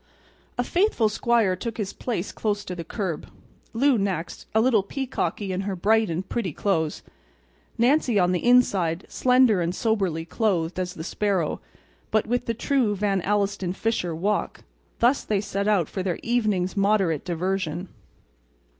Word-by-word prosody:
The 245 Hz, -, +1 dB
faithful 345 Hz, -, +2 dB
squire 220 Hz, -3 st, +2 dB
took 230 Hz, +4 st, -5 dB
his 205 Hz, -3 st, -3 dB
place 215 Hz, -7 st, -3 dB
close 205 Hz, -2 st, -2 dB
to 185 Hz, -, -5 dB
the 175 Hz, -2 st, -5 dB
curb; 175 Hz, -1 st, -4 dB, 0.4 s
Lou 255 Hz, +1 st, +3 dB
next, 190 Hz, -4 st, -3 dB
a -, -, +6 dB
little 225 Hz, -2 st, +4 dB
peacocky 210 Hz, -3 st, -3 dB
in 185 Hz, +1 st, -1 dB
her 195 Hz, -1 st, -3 dB
bright 220 Hz, +3 st, +2 dB
and 175 Hz, +3 st, -3 dB
pretty 200 Hz, -9 st, -2 dB
clothes; 160 Hz, -5 st, -1 dB, 0.7 s
Nancy 245 Hz, -1 st, +3 dB
on 180 Hz, -2 st, +3 dB
the 180 Hz, -, -1 dB
inside, 195 Hz, -9 st, +3 dB
slender, 250 Hz, -6 st, +4 dB
and 170 Hz, +2 st, -1 dB
soberly 190 Hz, -8 st, 0 dB
clothed 180 Hz, -3 st, 0 dB
as 180 Hz, -1 st, -3 dB
the 160 Hz, -, -6 dB
sparrow, 190 Hz, -3 st, -1 dB, 0.5 s
but 215 Hz, -1 st, +2 dB
with 245 Hz, +2 st, -1 dB
the 230 Hz, -, -1 dB
true 240 Hz, -3 st, +1 dB
Van 200 Hz, -1 st, 0 dB
Alstyne 195 Hz, -2 st, 0 dB
Fisher 185 Hz, -7 st, -1 dB
walk—thus 210 Hz, -, -1 dB
they 210 Hz, -2 st, 0 dB
set 200 Hz, 0 st, -2 dB
out 195 Hz, -7 st, +3 dB
for 190 Hz, -, -4 dB
their 185 Hz, -2 st, -1 dB
evening's 215 Hz, -6 st, 0 dB
moderate 195 Hz, -6 st, +2 dB
diversion. 180 Hz, 0 st, -2 dB
200 Hz, 155 wpm, -25 LUFS, 180-225 Hz, 0.7 s, a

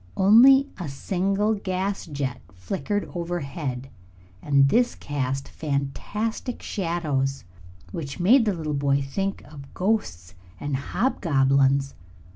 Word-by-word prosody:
Only 255 Hz, +8 st, +7 dB
a 170 Hz, -5 st, -4 dB
single 195 Hz, +8 st, 0 dB
gas 195 Hz, -1 st, -3 dB
jet 140 Hz, -5 st, -4 dB
flickered 140 Hz, -, -3 dB
overhead, 145 Hz, -7 st, -4 dB, 0.5 s
and 140 Hz, -1 st, +4 dB
this 240 Hz, -, +2 dB
cast 135 Hz, -1 st, -3 dB
fantastic 160 Hz, -, -3 dB
shadows 150 Hz, -7 st, -1 dB, 0.5 s
which 140 Hz, -, -6 dB
made 225 Hz, +7 st, +5 dB
the 210 Hz, -, +1 dB
little 155 Hz, -3 st, -3 dB
boy 140 Hz, 0 st, +1 dB
think 195 Hz, +8 st, -3 dB
of 140 Hz, -3 st, -12 dB
ghosts 95 Hz, -, -1 dB, 0.3 s
and 145 Hz, -1 st, -2 dB
hobgoblins. 140 Hz, -, +1 dB
150 Hz, 105 wpm, -25 LUFS, 135-195 Hz, 0.5 s, Only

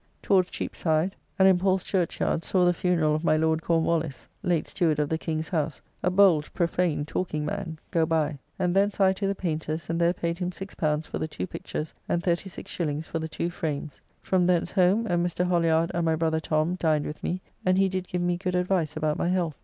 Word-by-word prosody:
Towards 185 Hz, -2 st, +3 dB
Cheapside; 160 Hz, +3 st, -1 dB, 0.2 s
and 190 Hz, -, +6 dB
in 185 Hz, -2 st, +5 dB
Paul's 190 Hz, 0 st, +2 dB
Churchyard 175 Hz, -3 st, 0 dB
saw 185 Hz, -2 st, +2 dB
the 175 Hz, -, +4 dB
funeral 165 Hz, -3 st, +1 dB
of 155 Hz, +2 st, -1 dB
my 155 Hz, -2 st, +3 dB
Lord 160 Hz, 0 st, +1 dB
Cornwallis, 165 Hz, -3 st, 0 dB
late 175 Hz, -5 st, 0 dB
Steward 165 Hz, -5 st, +1 dB
of 150 Hz, -1 st, 0 dB
the 160 Hz, -, 0 dB
King's 160 Hz, -1 st, -3 dB
House, 155 Hz, -5 st, -1 dB, 0.2 s
a 180 Hz, -, +2 dB
bold 180 Hz, -5 st, +4 dB
profane 170 Hz, -4 st, +1 dB
talking 155 Hz, -2 st, -2 dB
man, 170 Hz, -1 st, -4 dB
go 165 Hz, -1 st, +2 dB
by, 155 Hz, -3 st, 0 dB, 0.2 s
and 180 Hz, -1 st, 0 dB
thence 200 Hz, +1 st, +2 dB
I 190 Hz, -1 st, +5 dB
to 195 Hz, +1 st, -2 dB
the 200 Hz, -, 0 dB
Paynter's, 160 Hz, -2 st, -3 dB
and 165 Hz, +1 st, -1 dB
there 170 Hz, 0 st, +4 dB
paid 170 Hz, -1 st, -3 dB
him 180 Hz, -1 st, -1 dB
L6 160 Hz, -5 st, -2 dB
for -, -, -5 dB
the 155 Hz, -, -1 dB
two 155 Hz, -, -4 dB
pictures, 155 Hz, -3 st, -5 dB, 0.2 s
and 170 Hz, -, 0 dB
36s. 170 Hz, -3 st, -2 dB
for 165 Hz, -, -3 dB
the 160 Hz, -, -3 dB
two 170 Hz, +2 st, -2 dB
frames. 150 Hz, -3 st, -4 dB, 0.2 s
From 180 Hz, -2 st, +2 dB
thence 175 Hz, -1 st, +2 dB
home, 190 Hz, +5 st, +3 dB
and 175 Hz, -5 st, +1 dB
Mr. 175 Hz, +1 st, 0 dB
Holliard 165 Hz, -2 st, +2 dB
and 170 Hz, -, 0 dB
my 160 Hz, -1 st, +2 dB
brother 160 Hz, 0 st, +1 dB
Tom 155 Hz, +3 st, 0 dB
dined 155 Hz, -3 st, +2 dB
with 150 Hz, -, -6 dB
me, 180 Hz, -, -2 dB, 0.2 s
and 185 Hz, 0 st, +3 dB
he 195 Hz, 0 st, +4 dB
did 185 Hz, -1 st, -3 dB
give 180 Hz, 0 st, -2 dB
me 175 Hz, 0 st, +1 dB
good 180 Hz, 0 st, -2 dB
advice 180 Hz, -4 st, 0 dB
about 155 Hz, -1 st, 0 dB
my -, -, +1 dB
health. 175 Hz, -5 st, -1 dB
170 Hz, 215 wpm, -26 LUFS, 160-180 Hz, 0.2 s, and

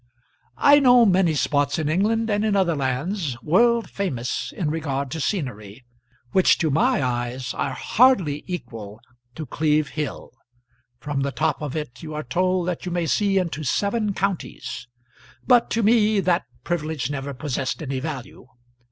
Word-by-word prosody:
I 285 Hz, 0 st, +6 dB
know 245 Hz, -3 st, +6 dB
many 185 Hz, -5 st, +3 dB
spots 145 Hz, 0 st, +1 dB
in 155 Hz, -2 st, -1 dB
England 215 Hz, +8 st, +1 dB
and 205 Hz, +1 st, +1 dB
in 215 Hz, -2 st, +1 dB
other 180 Hz, -4 st, +2 dB
lands, 140 Hz, -, -2 dB
world 235 Hz, +8 st, +3 dB
famous 135 Hz, -11 st, -3 dB
in 165 Hz, -8 st, -2 dB
regard 140 Hz, -4 st, -3 dB
to 160 Hz, -, -4 dB
scenery, 120 Hz, -, -4 dB, 0.5 s
which 190 Hz, -, +4 dB
to 160 Hz, -3 st, 0 dB
my 145 Hz, -1 st, +2 dB
eyes 125 Hz, 0 st, -2 dB
are 135 Hz, -, -2 dB
hardly 190 Hz, -, +2 dB
equal 115 Hz, -, -7 dB, 0.4 s
to 155 Hz, -, -5 dB
Cleeve 150 Hz, +1 st, +1 dB
Hill. 150 Hz, -2 st, -5 dB, 0.7 s
From 140 Hz, +2 st, -3 dB
the 140 Hz, 0 st, -1 dB
top 160 Hz, +3 st, -1 dB
of 150 Hz, -2 st, -4 dB
it 125 Hz, -6 st, -5 dB
you 155 Hz, -1 st, -7 dB
are 150 Hz, -, -3 dB
told 185 Hz, +6 st, 0 dB
that 180 Hz, -2 st, -3 dB
you 180 Hz, -, -4 dB
may 175 Hz, -1 st, -1 dB
see 195 Hz, +4 st, +1 dB
into 170 Hz, -4 st, -1 dB
seven 200 Hz, -, 0 dB
counties; 190 Hz, -8 st, -3 dB, 0.6 s
but 245 Hz, -2 st, +4 dB
to 230 Hz, -, 0 dB
me 215 Hz, -1 st, +4 dB
that 180 Hz, -1 st, +1 dB, 0.2 s
privilege 155 Hz, -5 st, -2 dB
never 140 Hz, -1 st, -4 dB
possessed 135 Hz, -1 st, -3 dB
any 135 Hz, -2 st, -3 dB
value. 130 Hz, -4 st, -7 dB
160 Hz, 160 wpm, -23 LUFS, 135-195 Hz, 0.7 s, I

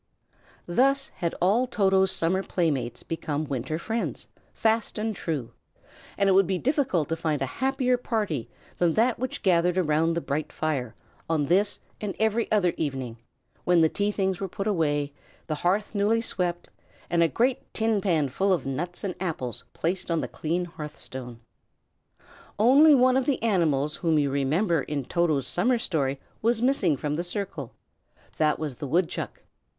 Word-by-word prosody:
Thus 270 Hz, +9 st, +2 dB
had 170 Hz, -1 st, -2 dB
all 215 Hz, +8 st, +3 dB
Toto's 190 Hz, -4 st, +3 dB
summer 185 Hz, +3 st, +1 dB
playmates 145 Hz, -11 st, -1 dB
become 155 Hz, -2 st, -3 dB
winter 135 Hz, +2 st, -3 dB
friends, 225 Hz, +7 st, -3 dB, 0.3 s
fast 225 Hz, 0 st, 0 dB
and 215 Hz, 0 st, -2 dB
true; 150 Hz, -10 st, -3 dB, 0.7 s
and 200 Hz, -, +2 dB
it -, -, +5 dB
would 190 Hz, -1 st, +5 dB
be 190 Hz, 0 st, 0 dB
difficult 255 Hz, -, +1 dB
to 165 Hz, -, 0 dB
find 155 Hz, -3 st, -1 dB
a 135 Hz, -, 0 dB, 0.2 s
happier 260 Hz, -1 st, +2 dB
party 210 Hz, -, -2 dB, 0.3 s
than 175 Hz, -2 st, +3 dB
that 235 Hz, +2 st, +2 dB
which 255 Hz, +1 st, -3 dB
gathered 180 Hz, -1 st, +3 dB
round 165 Hz, -1 st, +2 dB
the -, -, +1 dB
bright 150 Hz, -1 st, -3 dB
fire, 130 Hz, -7 st, -2 dB, 0.3 s
on 155 Hz, -3 st, +1 dB
this 195 Hz, +6 st, +2 dB, 0.2 s
and 205 Hz, -2 st, -3 dB
every 220 Hz, +1 st, +1 dB
other 195 Hz, -5 st, +3 dB
evening, 130 Hz, -6 st, -3 dB, 0.5 s
when 175 Hz, -1 st, +4 dB
the 160 Hz, -, +5 dB
tea 205 Hz, +4 st, 0 dB
things 190 Hz, -3 st, -1 dB
were 195 Hz, -, -2 dB
put 195 Hz, +2 st, -5 dB
away, 145 Hz, -8 st, 0 dB, 0.3 s
the 155 Hz, -, -2 dB
hearth 200 Hz, +5 st, +1 dB
newly 210 Hz, +2 st, +2 dB
swept, 180 Hz, -6 st, -2 dB, 0.4 s
and 170 Hz, -1 st, +1 dB
a 165 Hz, -, +5 dB
great 245 Hz, +9 st, 0 dB
tin 220 Hz, -2 st, +1 dB
pan 165 Hz, -8 st, +2 dB
full 195 Hz, +10 st, 0 dB
of 175 Hz, -7 st, +1 dB
nuts 170 Hz, +7 st, -4 dB
and 195 Hz, -3 st, -2 dB
apples 155 Hz, -10 st, -4 dB
placed 180 Hz, +3 st, -2 dB
on 165 Hz, -1 st, +1 dB
the -, -, -2 dB
clean 170 Hz, +3 st, -2 dB
hearth 150 Hz, -4 st, -8 dB
stone. 125 Hz, -3 st, -8 dB, 1.2 s
Only 280 Hz, +8 st, +7 dB
one 255 Hz, 0 st, +4 dB
of 265 Hz, -, 0 dB
the 275 Hz, -5 st, 0 dB
animals 155 Hz, -9 st, +1 dB
whom 165 Hz, -3 st, +1 dB
you 145 Hz, -2 st, +2 dB
remember 155 Hz, +5 st, +1 dB
in 140 Hz, -3 st, -3 dB
Toto's 155 Hz, -4 st, +1 dB
summer 235 Hz, -, +2 dB
story 140 Hz, -, -1 dB, 0.2 s
was 230 Hz, +1 st, +2 dB
missing 225 Hz, -, +2 dB
from 150 Hz, +2 st, -2 dB
the 170 Hz, -, -1 dB
circle; 175 Hz, -, -5 dB, 0.6 s
that 155 Hz, -1 st, +2 dB
was 150 Hz, -6 st, -4 dB
the 145 Hz, -, -5 dB
woodchuck. 170 Hz, +5 st, -1 dB
175 Hz, 170 wpm, -26 LUFS, 150-210 Hz, 1.2 s, Only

